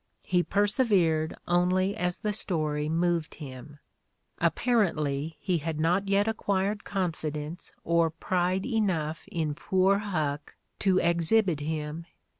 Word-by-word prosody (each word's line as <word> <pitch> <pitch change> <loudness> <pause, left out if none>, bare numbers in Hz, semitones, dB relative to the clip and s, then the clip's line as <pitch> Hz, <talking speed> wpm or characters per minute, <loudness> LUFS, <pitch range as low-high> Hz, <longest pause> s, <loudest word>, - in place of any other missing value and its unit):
He 180 -1 +2
persevered 195 -6 +2
only 185 +3 +2
as 180 -4 -1
the 210 -1 -2
story 155 -7 0
moved 170 0 0
him.... 145 0 -10 0.6
Apparently, 160 - +1
he 180 -1 0
had 155 0 -4
not 175 +5 +1
yet 200 +2 +2
acquired 205 -2 -1
confidence 160 -4 -3
or 170 0 +3
pride 180 +3 -1
enough 185 - -1
in 155 -3 -1
poor 190 +5 +2
Huck 155 -8 -3 0.2
to 190 -2 +3
exhibit 170 +1 +3
him. 155 +2 -4
175 Hz, 115 wpm, -28 LUFS, 155-195 Hz, 0.6 s, or